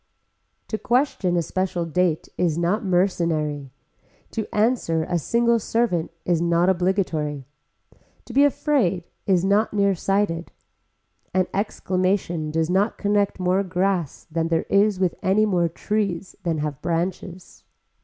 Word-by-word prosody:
To 220 Hz, -, -2 dB
question 240 Hz, -8 st, +1 dB
a 170 Hz, -, +1 dB
special 180 Hz, 0 st, -2 dB
date 170 Hz, -1 st, 0 dB
is 165 Hz, -3 st, 0 dB
not 175 Hz, +6 st, 0 dB
mercenary. 165 Hz, -6 st, 0 dB, 0.6 s
To 220 Hz, -2 st, -3 dB
answer 210 Hz, -8 st, +1 dB
a 175 Hz, +1 st, -1 dB
single 235 Hz, +6 st, +2 dB
servant 225 Hz, -8 st, 0 dB, 0.2 s
is 170 Hz, -2 st, +1 dB
not 170 Hz, +1 st, +3 dB
obligatory. 175 Hz, -6 st, 0 dB, 0.8 s
To 240 Hz, -, -10 dB
be 275 Hz, +3 st, +5 dB
afraid 255 Hz, -, +1 dB, 0.2 s
is 185 Hz, -2 st, +3 dB
not 205 Hz, +2 st, +2 dB
nearsighted. 195 Hz, -3 st, 0 dB, 0.8 s
An 185 Hz, -1 st, +3 dB
exclamation 185 Hz, -5 st, -1 dB
does 160 Hz, +1 st, 0 dB
not 195 Hz, +5 st, +1 dB
connect 205 Hz, -1 st, 0 dB
more 185 Hz, +1 st, +2 dB
grass 185 Hz, -4 st, -1 dB
than 165 Hz, 0 st, 0 dB
there 165 Hz, -1 st, 0 dB
is 200 Hz, -1 st, +3 dB
with 185 Hz, -3 st, +1 dB
any 200 Hz, +3 st, +3 dB
more 175 Hz, -5 st, +1 dB
trees 195 Hz, 0 st, -2 dB
than 165 Hz, -3 st, -1 dB
have 150 Hz, -3 st, -3 dB
branches. 175 Hz, +1 st, -4 dB
185 Hz, 130 wpm, -23 LUFS, 170-200 Hz, 0.8 s, be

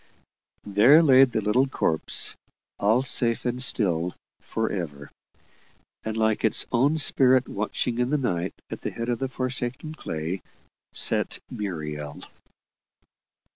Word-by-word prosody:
There 120 Hz, +11 st, +5 dB
laid 135 Hz, -3 st, +6 dB
the 110 Hz, -, -1 dB
little 120 Hz, +6 st, +2 dB
corpse, 80 Hz, -11 st, +1 dB, 0.5 s
all 110 Hz, +6 st, +2 dB
safe 120 Hz, -4 st, 0 dB
and 125 Hz, +1 st, -2 dB
still 90 Hz, -9 st, +2 dB, 0.2 s
for 110 Hz, 0 st, -3 dB
ever. 75 Hz, -7 st, -6 dB, 0.9 s
And 110 Hz, 0 st, -4 dB
like 110 Hz, -1 st, 0 dB
its 110 Hz, -, +2 dB
own 140 Hz, +6 st, +2 dB
spirit 130 Hz, -3 st, +4 dB
watching 110 Hz, +3 st, -3 dB
in 125 Hz, 0 st, 0 dB
the 150 Hz, -, +1 dB
night 90 Hz, -9 st, -2 dB, 0.2 s
at -, -, -6 dB
the -, -, -3 dB
head 115 Hz, +1 st, -5 dB
of 120 Hz, -, -1 dB
the 135 Hz, -, -2 dB
forsaken 130 Hz, +3 st, -4 dB
clay, 80 Hz, -, -5 dB, 0.5 s
sat -, -, +1 dB
Muriel. 75 Hz, -7 st, -5 dB
115 Hz, 130 wpm, -25 LUFS, 95-130 Hz, 0.9 s, laid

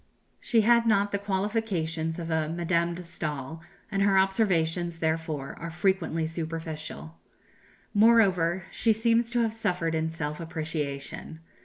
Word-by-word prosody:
She 230 Hz, -2 st, +2 dB
had 235 Hz, +1 st, +4 dB
not 200 Hz, -2 st, +3 dB
the 200 Hz, -, 0 dB
qualifications 190 Hz, -6 st, -1 dB
of 165 Hz, -1 st, -4 dB
a 160 Hz, -1 st, 0 dB
Madame 170 Hz, 0 st, 0 dB
de 180 Hz, +1 st, -7 dB
Staël, 155 Hz, -3 st, -5 dB, 0.3 s
and 195 Hz, -, 0 dB
her 195 Hz, -1 st, +4 dB
observations, 175 Hz, -4 st, +1 dB
therefore, 160 Hz, -3 st, -2 dB
are 170 Hz, -, -5 dB
frequently 175 Hz, -2 st, 0 dB
superficial. 160 Hz, -, -5 dB, 0.7 s
Moreover, 190 Hz, -5 st, +4 dB
she 225 Hz, -, +2 dB
seems 230 Hz, +1 st, +2 dB
to 240 Hz, 0 st, +1 dB
have 225 Hz, -1 st, 0 dB
suffered 180 Hz, -7 st, -1 dB
in 160 Hz, 0 st, 0 dB
self 150 Hz, -1 st, -4 dB
appreciation. 155 Hz, -2 st, -5 dB
170 Hz, 135 wpm, -27 LUFS, 160-200 Hz, 0.7 s, had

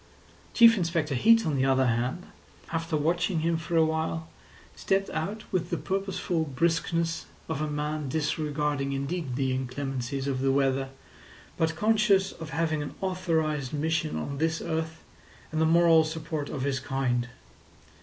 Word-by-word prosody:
Chief 230 Hz, -1 st, +8 dB
Inspector 165 Hz, -4 st, 0 dB
Heat, 225 Hz, -, +5 dB
on 155 Hz, -3 st, 0 dB
the 130 Hz, -, +2 dB
other 130 Hz, 0 st, +3 dB
hand, 125 Hz, +8 st, -1 dB, 0.5 s
after 165 Hz, -1 st, -1 dB
watching 165 Hz, +3 st, +1 dB
him 165 Hz, +1 st, +1 dB
for 165 Hz, +1 st, -3 dB
a 160 Hz, -, +6 dB
while, 160 Hz, 0 st, -2 dB, 0.5 s
stepped 195 Hz, 0 st, 0 dB
out 200 Hz, +8 st, -3 dB
with 175 Hz, -2 st, 0 dB
the 170 Hz, -, -1 dB
purposeful 190 Hz, -3 st, -1 dB
briskness 165 Hz, +3 st, 0 dB, 0.2 s
of 145 Hz, -, -3 dB
a 155 Hz, -, -1 dB
man 150 Hz, -1 st, -2 dB
disregarding 150 Hz, -2 st, -1 dB
indeed 140 Hz, 0 st, -3 dB
the 130 Hz, -1 st, 0 dB
inclemencies 135 Hz, +1 st, -3 dB
of 130 Hz, -2 st, -1 dB
the 135 Hz, 0 st, +2 dB
weather, 135 Hz, -1 st, +1 dB, 0.7 s
but 160 Hz, 0 st, 0 dB
conscious 210 Hz, -1 st, +3 dB
of 160 Hz, -2 st, -9 dB
having 160 Hz, -2 st, 0 dB
an 145 Hz, -, -6 dB
authorised 160 Hz, -7 st, -1 dB
mission 155 Hz, +1 st, 0 dB
on 140 Hz, -1 st, -4 dB
this 160 Hz, 0 st, +1 dB
earth 160 Hz, 0 st, -3 dB, 0.5 s
and 155 Hz, 0 st, 0 dB
the 160 Hz, -, +4 dB
moral 165 Hz, -1 st, +6 dB
support 155 Hz, -2 st, -4 dB
of 135 Hz, -3 st, -4 dB
his 135 Hz, -1 st, 0 dB
kind. 130 Hz, -3 st, -1 dB
160 Hz, 155 wpm, -28 LUFS, 140-170 Hz, 0.7 s, Chief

